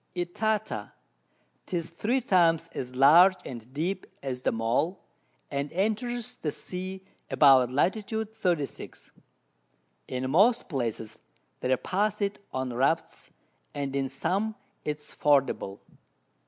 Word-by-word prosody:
Itata; 175 - -2 0.7
'tis 170 -3 -3
3 235 +10 0
times 170 -8 +3
as 125 0 -6
large 165 +8 +7
and 120 -1 -8
deep 175 +7 -2 0.2
as 130 -2 -3
the - - +1
Maul, 125 +11 0 0.5
and 140 +1 -2
enters 240 +5 -1
the 150 - -2
Sea 185 +3 -6 0.2
about 135 -4 +6
Lat. 145 +8 +3
36. 215 -7 -3 1.0
In 130 0 -3
most 215 - +4
Places 115 - -3 0.4
they 130 +1 +2
pass 205 +7 0
it 200 -1 -1
on 130 -1 -3
Rafts, 135 +7 0 0.5
and 140 -1 -3
in 135 -1 0
some 195 +11 -1 0.3
it 150 -1 -2
is 150 0 -13
fordable. 135 -9 +1
165 Hz, 115 wpm, -28 LUFS, 135-195 Hz, 1.0 s, large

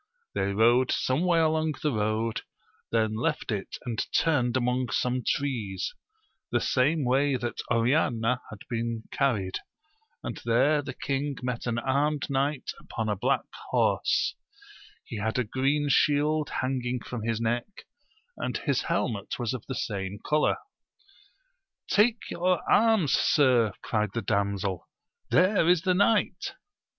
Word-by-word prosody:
They 100 - 0
rode 120 +5 +4
some 130 +7 +1
way 175 -2 +3
along 160 -1 +1
the 150 - +2
road, 110 0 -1 0.5
then 110 -1 +2
left 115 +1 -1
it 100 -3 -4
and 115 -3 -1
turned 130 -6 +2
among 125 0 0
some 125 +4 0
trees, 110 -11 -2 0.6
the - - +2
same 145 +3 +1
way 135 +2 +2
that 120 -1 -3
Oriana 120 -1 +2
had 110 - -10
been 115 -1 -3
carried, 105 -9 0 0.6
and - - -4
there 130 +6 +3
the 135 -2 -7
king 140 +1 -2
met 125 -1 -3
an 120 -1 0
armed 140 +4 0
knight 140 +1 0
upon 110 -1 -4
a 105 - +1
black 95 - 0 0.2
horse; - - +2 0.7
he 115 - -6
had 110 +3 -1
a 125 - +2
green 135 +6 0
shield 150 +2 +2
hanging 125 -1 -2
from 120 -1 -6
his 115 0 -1
neck, 120 - -2 0.5
and - - -2
his - - 0
helmet 105 -6 -2
was 120 -2 -2
of 125 -4 -6
the 130 - -4
same 100 -2 -3
colour. 150 0 +2 1.3
Take 220 +2 +2
your 180 +1 0
arms, 220 - +4
sir, 125 -8 +4
cried 105 -3 -1
the 115 - -1
damsel, 100 -2 -1 0.4
there 185 -1 +4
is 175 -2 +4
the 185 -1 +3
knight 205 +3 +1
125 Hz, 140 wpm, -27 LUFS, 115-145 Hz, 1.3 s, rode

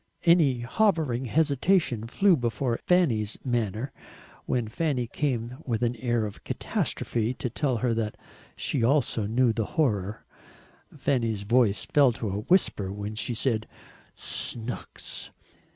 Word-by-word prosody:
Any 155 -8 +4
hovering 150 - +1
hesitation 145 - +2
flew 195 +9 +4
before 120 -1 -1
Fanny's 120 - +2
manner, 120 +1 -1 0.6
when 120 -3 0
Fanny 130 +1 -1
came 125 -1 -2
with 120 -2 -1
an 120 +1 +1
air 120 -2 0
of 105 - -8
catastrophe 115 +2 -2
to 125 - -4
tell 130 -2 0
that 115 -2 -1 0.4
she 130 - -1
also 120 -4 +2
knew 120 +1 +2
the 110 0 -1
horror. 105 -8 0 0.7
Fanny's 115 -6 -1
voice 110 -1 +3
fell 140 -4 +4
to 110 -2 -4
a 100 - -2
whisper 105 - +2
when 105 +1 -5
she 110 +2 -2
said 110 -2 0 0.5
SNOOKS. 120 0 -2
120 Hz, 125 wpm, -27 LUFS, 110-140 Hz, 0.7 s, Any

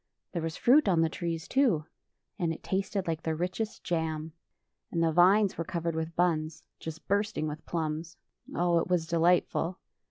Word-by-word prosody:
There 170 - -2
was 160 0 -3
fruit 270 +1 +5
on 170 -3 +4
the 165 - +3
trees, 165 -1 -4
too, 235 - +2 0.5
and 170 -3 +1
it 160 - -7
tasted 195 0 -1
like 165 -1 -2
the 160 -1 -1
richest 185 +6 -3
jam. 160 -2 -2 0.6
And 165 -1 0
the 165 - +3
vines 190 +4 +4
were - - +1
covered 170 0 -2
with 160 +1 -3
buns, 160 -2 0 0.2
just 160 0 -8
bursting 200 -5 0
with 155 +1 -7
plums. 160 0 -3 0.4
Oh, 175 -1 +3
it - - -2
was 180 -3 +1
delightful! 170 +1 +2
170 Hz, 170 wpm, -29 LUFS, 160-180 Hz, 0.6 s, fruit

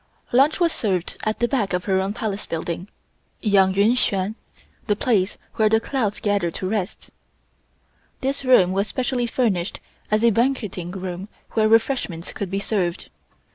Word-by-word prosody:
Lunch 275 +7 +4
was 340 -2 +3
served 185 - -1
at 215 0 0
the 240 - +1
back 235 -8 0
of 180 0 -1
her 190 -2 +2
own 195 +2 -2
Palace 215 -4 -3
building 170 +2 -4 0.5
(Yang 195 -3 +3
Yuen 200 +3 +4
Hsuen 200 -4 +1 0.5
the 205 - +2
place 205 -4 +1 0.2
where 215 -1 +4
the 220 +1 +4
clouds 225 -4 -2
gather 205 -4 +1
to 185 +3 -4
rest). 195 -2 -3 1.1
This 275 +1 -1
room 245 -9 +5
was 195 +2 0
specially 250 0 -1
furnished 210 -7 0 0.3
as 215 +1 +2
a 235 - +6
banqueting 225 -7 0
room 185 0 -5 0.2
where 215 -1 +2
refreshments 225 -7 +1
could 200 - -4
be 195 +1 -1
served. 190 -4 -2
205 Hz, 160 wpm, -23 LUFS, 190-235 Hz, 1.1 s, a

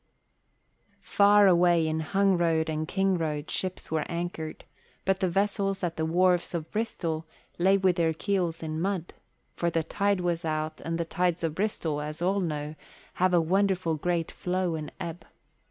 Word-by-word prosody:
Far 205 0 +5
away 175 -3 +4
in 160 0 -1
Hungroad 170 -2 +2
and 155 0 -2
Kingroad 165 -6 0
ships 185 -3 -4
were 160 -1 +1
anchored, 170 -2 -4 0.4
but 190 0 +2
the 185 - +1
vessels 195 +1 0
at 170 -1 -1
the 160 0 -1
wharves 180 +1 +2
of 160 -1 -4
Bristol 165 -8 -2 0.3
lay 190 +3 +5
with 185 -2 +2
their 165 -1 +2
keels 175 -3 -1
in 155 0 -3
mud, 185 -2 -2 0.4
for 170 - 0
the 165 -1 0
tide 200 +3 0
was 175 -1 -1
out 155 -1 -2
and 165 0 -2
the 170 - -1
tides 175 0 0
of 160 -2 0
Bristol, 165 -6 -1
as 150 +1 -5
all 190 +3 +1
know, 150 -4 -3 0.5
have 185 0 +4
a - - +6
wonderful 185 0 +1
great 165 +1 -1
flow 180 -1 -1
and 155 -2 -5
ebb. 170 0 -6
175 Hz, 165 wpm, -28 LUFS, 160-190 Hz, 0.5 s, a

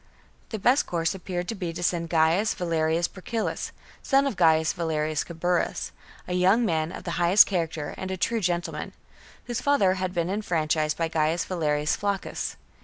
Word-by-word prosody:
The 220 - -3
best 245 +7 +3
course 165 0 0
appeared 180 -1 -4
to - - -1
be 180 -5 -4
to 175 +1 -5
send 170 -1 0
Gaius 165 +6 +2
Valerius 165 -1 0
Procillus/ 220 +4 -4 0.3
son 275 0 +3
of 275 - -1
Gaius 160 -2 +4
Valerius 155 -3 -1
Caburus, 175 +1 -1 0.4
a 180 - -3
young 190 +6 +4
man 160 -4 0
of - - -8
the 170 0 -3
highest 180 +4 +7
character 165 -5 -2
and 190 - -4
a 190 - -3
true 230 +5 0
gentleman, 175 -2 -2 0.5
whose 240 -1 -3
father 245 -10 +3
had 185 -1 -2
been 175 0 -1
enfranchised 155 -6 0
by 165 - 0
Gaius 160 +1 0
Valerius 150 -4 0
Flaccus. 200 -1 -3
175 Hz, 170 wpm, -26 LUFS, 160-190 Hz, 0.5 s, highest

